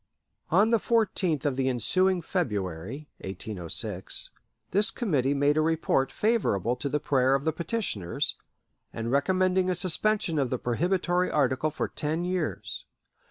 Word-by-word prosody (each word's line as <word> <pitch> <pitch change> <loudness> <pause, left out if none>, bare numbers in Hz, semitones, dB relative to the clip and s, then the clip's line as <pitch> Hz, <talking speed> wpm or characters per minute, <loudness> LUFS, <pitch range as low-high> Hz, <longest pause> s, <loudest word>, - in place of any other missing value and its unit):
On 205 +7 +4
the 230 - +4
14th 190 - +1
of 140 -3 +1
the 130 -1 +1
ensuing 180 - +2
February 105 - -3
(1806), 95 0 -3 0.4
this 205 +3 +4
committee 145 - 0
made 145 +2 +2
a - - +4
report 155 -4 +1
favorable 160 - +1
to 140 - -3
the 150 - 0
prayer 135 -2 +2
of 140 +2 -2
the 160 - +1
petitioners, 165 - -1 0.6
and 115 +1 -4
recommending 185 +5 +2
a 180 - +1
suspension 185 -1 +1
of 135 -3 +1
the 130 - -1
prohibitory 175 +8 0
article 140 +1 +1
for 155 - -3
ten 155 +3 -2
years. 180 -4 -3
155 Hz, 140 wpm, -27 LUFS, 125-185 Hz, 0.6 s, On